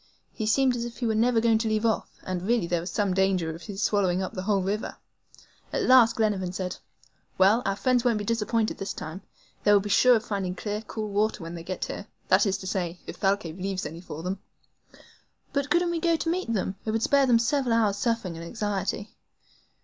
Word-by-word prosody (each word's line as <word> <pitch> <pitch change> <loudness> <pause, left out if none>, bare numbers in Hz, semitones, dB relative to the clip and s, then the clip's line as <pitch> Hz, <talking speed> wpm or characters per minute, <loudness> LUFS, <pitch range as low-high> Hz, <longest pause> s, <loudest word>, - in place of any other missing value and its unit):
He 215 - -3
seemed 260 +3 +3
as 235 - -3
if 235 0 -7
he 245 - -2
were 225 - +1
never 230 +2 +3
going 225 -1 +3
to 225 - -1
leave 215 +1 0
off, 220 -2 0
and 185 -1 -3
really 225 0 +1
there 170 0 0
was 175 - -5
some 200 0 0
danger 185 -4 +1
of 165 - -10
his 205 +1 -5
swallowing 190 -4 +2
up 190 -1 -3
the 185 - -4
whole 195 -1 +1
river. 205 +4 -3 0.7
At - - -1
last 240 -3 +6
Glenarvan 200 -5 0
said: 185 -1 -4 0.6
"Well, 200 +5 +5
our 195 - +1
friends 250 +2 +2
won't 240 -3 +2
be 210 - -3
disappointed 225 0 0
this 195 0 -3
time; 160 +5 -7 0.4
they 205 - +4
will 205 - +7
be 205 +1 -5
sure 250 +4 +6
of 225 0 -1
finding 195 -4 -2
clear, 210 +2 -3
cool 215 -1 -5
water 205 -2 0
when 165 +1 -6
they 170 - -6
get 180 +2 -4
here 205 - -6 0.2
that 195 +3 +5
is 195 0 +1
to 195 - -10
say, 180 -2 -2
if - - -8
Thalcave 195 -4 0
leaves 190 0 -2
any 165 +3 -7
for 160 -3 -8
them." 185 +2 -3 1.1
"But 280 0 0
couldn't 345 +2 +2
we 335 - -1
go 335 0 +2
to 325 - -2
meet 360 -8 -2
them? 195 -2 -1
It - - -4
would 225 +1 0
spare 280 +1 +4
them 240 -2 +5
several 240 0 +1
hours' 210 -3 +2
suffering 230 -7 -1
and 165 - -7
anxiety." 205 +1 -3
205 Hz, 225 wpm, -26 LUFS, 190-230 Hz, 1.1 s, will